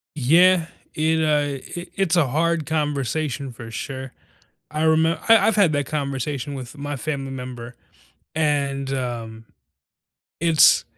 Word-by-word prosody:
Yeah. 165 +5 +4 0.3
It, 160 +1 +1
uh, 145 0 -1
i 180 - -9
it's 190 -4 +1
a 165 -4 +4
hard 165 +2 0
conversation 145 -3 -2
for 115 -1 -10
sure. 130 +2 -6 0.6
I 155 +1 -2
remember 160 +1 +3
I 225 - +9
I've 220 - +2
had 195 -6 +4
that 145 -2 0
conversation 140 -1 -3
with 130 +1 -8
my 145 0 -4
family 135 -1 -4
member 125 -2 -7 0.6
and, 140 -3 0
um, 115 -3 -5 1.0
it's 165 -3 +5
145 Hz, 130 wpm, -22 LUFS, 130-160 Hz, 1.0 s, I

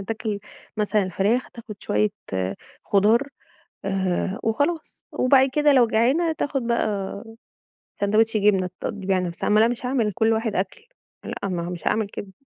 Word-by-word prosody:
تاكل 215 +1 -3 0.4
مثلًا 210 0 +1
الفراخ، 200 +7 0
تاخد 230 -2 -9
شوية 210 0 +1 0.7
خضار 220 +7 +3 0.6
آآ 190 +2 -1
وخلاص. 290 +9 -1
وبعد 265 +1 +4
كده 295 -1 +4
لو 245 -3 +5
جعانه 265 +10 +2
تاخد 280 -5 -2
بقي 205 -3 -1 0.8
ساندوتش 215 +2 +2
جبنة 195 -3 +2
تقضّي 195 -2 -5
بيها 190 -1 +2
نفسها. 175 -2 -3
ما 210 +1 +5
أنا 225 - +5
مش 245 +1 -3
هاعمل 250 -4 +1
لكل 220 +3 +1
واحد 220 -1 -1
أكل. 190 - -3 0.4
لأ 200 - -4
ما 175 -2 -2
مش 175 -1 -7
هاعامل 215 -1 +1
كده. 200 -1 -8
215 Hz, 150 wpm, -24 LUFS, 195-245 Hz, 0.8 s, لو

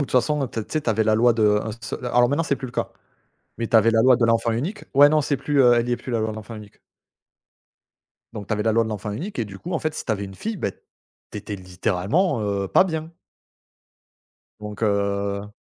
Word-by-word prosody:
toute - - -11
façon 140 +2 +2
t 110 -2 -5
tu - - -14
sais, 155 - +1
tu - - 0
avais 110 0 +1
la 110 0 +3
loi 120 +2 +4
de 105 -2 +3
un 110 - -4
seu - - -5
alors 120 0 +3
maintenant 145 +5 +1
c'est 140 -4 -1
plus 130 - -6
le 120 - -11
cas, - - -2 0.7
mais 115 - -2
tu 115 - +3
avais 110 +1 +5
la 115 0 +3
loi 130 0 +6
de 120 - +1
l'enfant 115 0 +2
unique. 155 - -3
Ouais, 145 +1 +8
non 155 0 +3
c'est 140 0 -1
plus, 140 +2 0
heu 120 -1 +6
elle 120 0 +1
y 120 - 0
est - - +1
plus 125 - -7
la 115 - 0
loi 110 0 -1
de 110 - -7
l'enfant 110 +2 -8
unique. 105 -2 -12 1.5
Donc 100 -2 -7
tu - - -2
avais 105 -1 0
la 110 0 +1
loi 115 +1 +3
de - - -5
l'enfant 105 -1 -4
unique 175 - -6
et 115 - 0
du 95 -1 -10
coup 175 - -7
en 165 - 0
fait, 155 0 -3
si - - -5
tu 110 - 0
avais 100 -1 -3
une 95 0 -9
fille 220 - -4
bah, 100 - -2
tu - - -15
étais 105 0 -6
littéralement, 95 - -1
heu, 100 -2 -2
pas 190 - +5
bien! 160 -1 -5 1.5
Donc 105 +1 -8
heu 100 0 -1
115 Hz, 255 wpm, -23 LUFS, 105-135 Hz, 1.5 s, Ouais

